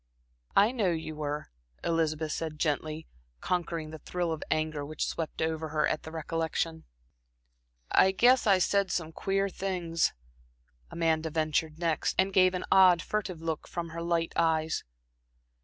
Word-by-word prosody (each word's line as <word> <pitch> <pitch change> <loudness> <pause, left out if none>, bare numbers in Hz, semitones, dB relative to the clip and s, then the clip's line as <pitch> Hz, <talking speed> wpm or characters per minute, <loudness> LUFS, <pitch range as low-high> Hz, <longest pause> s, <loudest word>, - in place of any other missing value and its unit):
"I 205 +4 +6
know 220 -7 +1
you 160 -2 -3
were," 150 0 -4 0.3
Elizabeth 160 -2 0
said 155 -1 -3
gently, 155 +1 -1 0.3
conquering 165 - -2
the 160 - -8
thrill 175 +2 -2
of 160 - -3
anger 155 -2 0
which 150 +1 -3
swept 160 -1 -3
over 160 0 -2
her 150 0 +1
at 155 - -1
the 160 - -9
recollection. 160 0 -2 1.1
"I 190 - +6
guess 245 +5 +4
I 195 -2 +6
said 195 +1 +2
some 160 -2 -2
queer 195 +4 0
things," 180 -4 -1 0.8
Amanda 160 -1 0
ventured 155 0 0
next, 165 -2 0
and 190 +1 +2
gave 185 -1 +5
an 180 - -3
odd, 185 -3 +6
furtive 190 -6 -3
look 160 -2 -3
from 170 -1 -4
her 165 +1 -6
light 170 -1 0
eyes. 160 -1 +1
165 Hz, 150 wpm, -29 LUFS, 155-180 Hz, 1.1 s, I